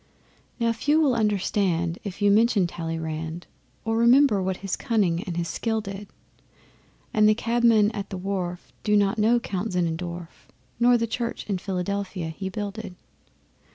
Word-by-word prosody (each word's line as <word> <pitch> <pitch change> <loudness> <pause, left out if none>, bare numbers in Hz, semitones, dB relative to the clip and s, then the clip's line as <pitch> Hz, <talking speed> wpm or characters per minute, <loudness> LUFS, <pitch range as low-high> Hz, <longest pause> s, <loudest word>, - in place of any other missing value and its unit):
Now 230 -1 +2
few 295 +7 +2
will 290 -5 +3
understand 195 -6 0
if 200 0 -5
you 205 - +5
mention 215 -2 +4
Talleyrand, 165 0 -4 0.4
Or 225 0 0
remember 235 -2 +5
what 185 0 -1
his 195 - -1
cunning 190 -7 +1
and 175 -2 -4
his 170 -1 -1
skill 220 +6 -1
did. 200 -1 -7 1.1
And 215 0 +5
the 215 - +4
cabmen 230 -2 +3
at 200 -2 -5
the 190 - -5
wharf 180 -2 -4
do 210 -1 +3
not 200 +2 +2
know 230 +3 +4
Count 200 -2 -4
Zinnendorf, 170 0 -3 0.3
Nor 245 0 +5
the 230 - 0
Church 230 +1 -4
in 195 -3 -1
Philadelphia 190 -1 -3
he 190 +4 -5
builded. 205 -1 -5
200 Hz, 155 wpm, -25 LUFS, 180-225 Hz, 1.1 s, you